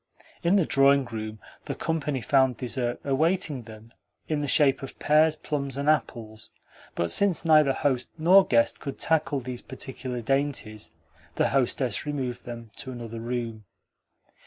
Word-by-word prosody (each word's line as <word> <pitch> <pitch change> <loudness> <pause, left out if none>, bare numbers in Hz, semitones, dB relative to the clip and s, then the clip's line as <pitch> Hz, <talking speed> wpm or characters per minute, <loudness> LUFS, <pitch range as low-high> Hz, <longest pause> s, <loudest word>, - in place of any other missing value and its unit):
In 175 +3 +3
the 190 -5 +3
drawing 140 -1 +4
room 110 -1 -6 0.3
the - - -4
company 150 -5 -2
found 130 +2 +2
dessert 125 -1 -3
awaiting 155 0 0
them 110 +1 -14 0.3
in 155 -2 -1
the 145 - -2
shape 140 -1 +3
of 135 - -8
pears, 155 +1 +3
plums, 140 -3 -4
and 140 +1 -2
apples; 115 -8 -1 0.5
but 85 -1 0
since 190 - +3
neither 155 -3 +5
host 130 -2 -1
nor 180 +5 +6
guest 115 -8 +2
could 140 - -6
tackle 155 -3 +1
these 125 0 -6
particular 130 -1 -6
dainties 120 -4 -2 0.5
the - - +2
hostess 130 -4 0
removed 130 -4 -4
them 115 -2 -8
to 130 - -6
another 115 -2 -7
room. 115 -2 -4
135 Hz, 150 wpm, -26 LUFS, 120-150 Hz, 0.5 s, nor